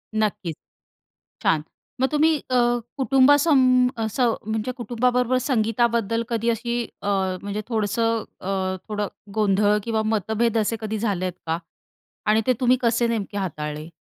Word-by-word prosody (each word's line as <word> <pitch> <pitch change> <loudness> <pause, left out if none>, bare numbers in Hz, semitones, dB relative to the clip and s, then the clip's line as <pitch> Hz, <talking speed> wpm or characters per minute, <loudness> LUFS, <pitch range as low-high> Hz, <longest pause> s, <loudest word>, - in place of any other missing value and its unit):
नक्कीच. 200 -7 -1 0.9
छान. 155 -2 +2 0.4
मग 265 - +5
अ, - - -14
तुम्ही 310 +1 +3
अ, 255 - +1 0.4
कुटुंबासं 265 -1 +5 0.2
असं 230 +1 +1
म्हणजे 220 +3 -2
कुटुंबाबरोबर 250 +1 +1
संगीताबद्दल 230 -1 +1
कधी 230 0 0
अशी 235 +1 -1 0.2
अ, - - -5 0.4
म्हणजे 205 +1 -3
थोडंसं 225 +1 0 0.2
अ, 190 0 -1
थोडं 210 -1 -1 0.3
गोंधळ 210 0 +3
किंवा 225 -2 0
मतभेद 220 +2 0
असे 220 +1 +1
कधी 220 0 -3
झालेत 185 -5 -1
का? 165 +1 0 0.7
आणि 215 +1 +3
ते 255 - +5
तुम्ही 250 +1 +4
कसे 235 0 +2
नेमके 215 -3 -2
हाताळले? 150 -4 -4
225 Hz, 135 wpm, -23 LUFS, 205-245 Hz, 0.9 s, मग